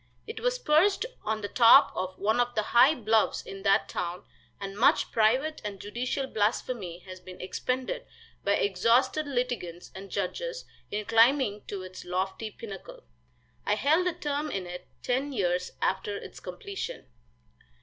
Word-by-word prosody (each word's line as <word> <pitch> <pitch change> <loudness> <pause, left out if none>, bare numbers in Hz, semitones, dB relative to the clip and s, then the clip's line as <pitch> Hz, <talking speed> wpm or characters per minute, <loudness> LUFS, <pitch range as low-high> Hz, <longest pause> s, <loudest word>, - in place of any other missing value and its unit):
It 450 - -6
was - - 0
perched 385 +1 +3 0.2
on 215 0 -1
the 205 - -3
top 240 +5 +7
of 185 0 -3
one 220 +4 +1
of 245 0 +1
the 215 - +1
high 250 +8 +5
bluffs 220 -3 +1
in 195 0 -8
that 195 0 +3
town, 175 +1 -4 0.4
and 195 -1 -6
much 225 - +3
private 255 +8 +2
and 205 -2 -5
judicial 245 +7 -2
blasphemy 205 -5 -2
has 185 -1 -9
been 185 0 -12
expended 255 - -3 0.4
by 200 - +2
exhausted 230 +10 +2
litigants 245 -10 -3
and 195 +1 -9
judges - - -3 0.2
in 210 0 -3
climbing 230 -1 +3
to 195 -2 -5
its 185 0 -9
lofty 190 +4 -2
pinnacle. 230 - -10 0.6
I - - +1
held 320 +6 +3
a 360 - +1
term 295 0 -2
in 195 -8 -3
it 180 0 -8 0.2
ten 270 +3 -1
years 180 -4 0
after 195 +2 0
its - - -10
completion. 425 +3 -6
225 Hz, 155 wpm, -28 LUFS, 195-280 Hz, 0.6 s, top